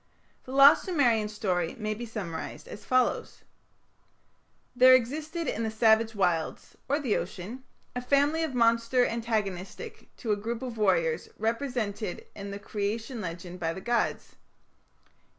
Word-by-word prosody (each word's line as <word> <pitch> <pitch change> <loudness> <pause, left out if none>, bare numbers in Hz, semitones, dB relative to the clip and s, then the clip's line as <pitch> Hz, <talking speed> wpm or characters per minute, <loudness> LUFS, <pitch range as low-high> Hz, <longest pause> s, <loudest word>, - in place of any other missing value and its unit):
The 255 - -9
lost 275 +1 +7
Sumerian 240 - +2
story 180 -5 -1
may 215 -1 -2
be 235 +3 -6
summarized 190 -8 -6
as 210 - -9
follows: 255 -1 0 1.3
There 255 +1 +8
existed 305 +7 -2
in 225 - -2
the 225 - 0
savage 220 0 +3
wilds, 175 -5 -1
or 285 +2 +2
the 255 -8 0
ocean, 200 +8 -5 0.3
a 250 - -2
family 285 +5 +2
of 315 -5 -2
monsters 230 +1 +3
antagonistic 220 - -4
to 225 - -3
a - - +4
group 230 +4 -4
of 240 -3 -6
warriors 470 - +1
represented 225 -4 -2
in 200 0 -7
the 200 - -5
Creation 215 +4 -3
legend 175 0 -6
by 165 -1 -1
the 190 - -7
gods. 240 +2 -1
230 Hz, 140 wpm, -28 LUFS, 205-255 Hz, 1.3 s, There